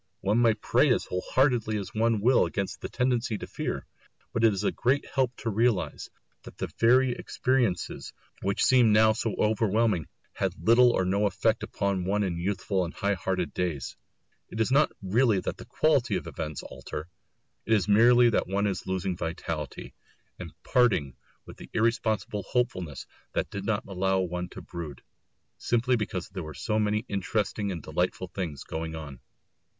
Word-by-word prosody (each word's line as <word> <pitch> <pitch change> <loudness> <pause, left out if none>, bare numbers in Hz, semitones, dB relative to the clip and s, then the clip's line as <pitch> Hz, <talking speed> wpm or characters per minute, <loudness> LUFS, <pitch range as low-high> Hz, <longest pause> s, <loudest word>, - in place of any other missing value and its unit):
One 105 +4 +2
may 115 -2 +4
pray 105 - +2
as - - +2
whole 90 - -3
heartedly 120 -5 +2
as 100 -3 -6
one 110 -1 +1
will 125 +4 +4
against 100 -2 -4
the - - -5
tendency 125 -3 0
to - - -6
fear; - - -4 0.5
but 115 - 0
it 115 - +6
is 100 0 -3
a - - +2
great 135 +4 +1
help 130 -3 0
to 115 - -3
realise 115 -1 0 0.3
that - - -13
the - - -4
very 125 +3 +5
experiences 120 -6 -1 0.3
which 100 +1 0
seem 125 -4 +5
now 110 +1 +6
so 110 -1 -2
overwhelming 110 -4 +1 0.3
had - - -2
little 115 +8 +6
or 95 -6 +1
no 100 +3 +2
effect 110 +4 +1
upon 100 -3 -1
one 105 +2 +1
in 85 -3 -2
youthful 95 +1 -1
and 85 - -6
high 100 0 0
hearted 90 -3 -2
days. 85 -8 -3 0.5
It 110 - -7
is 110 +3 +1
not 145 +3 +4
really 110 +2 +3
that - - -4
the - - -10
quality 130 -9 +2
of - - -3
events 75 -3 -5
alter; 75 +2 -7 0.6
it 110 - +3
is 100 -5 +2
merely 120 +3 +6
that - - +1
one 100 +2 0
is 95 -2 -2
losing 95 -1 -1
vitality, 80 -3 -5 0.5
and - - -7
parting 95 - +2 0.3
with - - -12
the - - -11
irresponsible 110 -3 0
hopefulness 90 - -2 0.3
that - - -2
did 100 -1 -5
not 105 -1 0
allow 95 0 0
one 90 0 -3
to - - -10
brood, 85 -5 -8 0.6
simply 125 +2 +1
because 105 -5 -3
there 95 - -6
were 80 -2 -8
so 110 0 -1
many 105 0 +1
other - - -24
interesting 100 +1 -1
and 85 -5 -5
delightful 90 +3 -2
things 85 -6 -5
going 80 0 -5
on. 70 -5 -8
105 Hz, 175 wpm, -27 LUFS, 90-115 Hz, 0.6 s, it